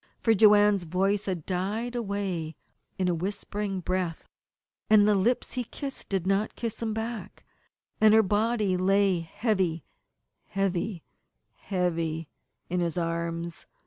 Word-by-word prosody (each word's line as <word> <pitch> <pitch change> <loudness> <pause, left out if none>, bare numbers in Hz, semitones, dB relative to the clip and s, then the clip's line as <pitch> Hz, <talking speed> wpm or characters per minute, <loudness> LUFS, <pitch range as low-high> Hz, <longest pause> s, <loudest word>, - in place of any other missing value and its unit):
For 225 - +3
Joanne's 205 -2 +5
voice 195 +4 +1
had 180 -5 -3
died 205 +6 -2
away 195 -8 -3 0.4
in 185 - 0
a 180 - +2
whispering 195 +2 -3
breath, 180 -2 -2 0.6
and 210 -1 +6
the 210 - +5
lips 215 +6 +1
he 250 - -1
kissed 270 +3 -7
did 190 -3 -1
not 195 +3 0
kiss 230 -2 -4
him 225 -1 -1
back, 225 +1 -5 0.5
and 215 -1 +6
her 220 - +6
body 210 -1 +1
lay 195 0 +3
heavy, 170 - -1 0.6
heavy, 195 -1 -1 0.5
heavy 165 -4 -2 0.4
in 180 +1 -1
his 170 0 -1
arms. 170 0 -3
195 Hz, 130 wpm, -27 LUFS, 175-210 Hz, 0.6 s, and